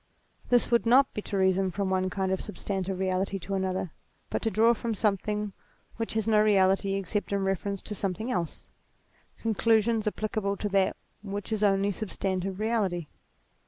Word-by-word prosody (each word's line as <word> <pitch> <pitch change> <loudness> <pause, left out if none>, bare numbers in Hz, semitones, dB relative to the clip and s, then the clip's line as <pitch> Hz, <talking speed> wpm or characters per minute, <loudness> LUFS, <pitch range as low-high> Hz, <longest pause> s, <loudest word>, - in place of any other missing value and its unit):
This 245 0 +3
would 235 -1 +3
not 260 +3 +5
be 210 - -3
to 200 - -3
reason 190 0 +3
from 190 +1 -2
one 185 0 +1
kind 190 0 -1
of 190 - 0
substantive 195 -3 -3
reality 190 +1 0
to 195 +1 -6
another, 190 -2 -1 0.4
but - - -1
to 225 - +1
draw 225 +3 +4
from 230 0 -3
something 210 0 0 0.4
which 225 -1 -3
has 220 -1 0
no 215 -1 +5
reality 195 -1 +3
except 195 +2 -2
in 200 -1 +1
reference 195 +1 -2
to 215 - -5
something 205 +4 -2
else, 170 -6 -3 0.7
conclusions 225 0 +2
applicable 210 -1 -1
to 205 - -2
that 195 -1 +2 0.3
which 200 +1 -5
is 215 - 0
the 210 - +4
only 195 0 +2
substantive 190 -2 -3
reality. 200 -8 0
200 Hz, 170 wpm, -28 LUFS, 190-215 Hz, 0.7 s, not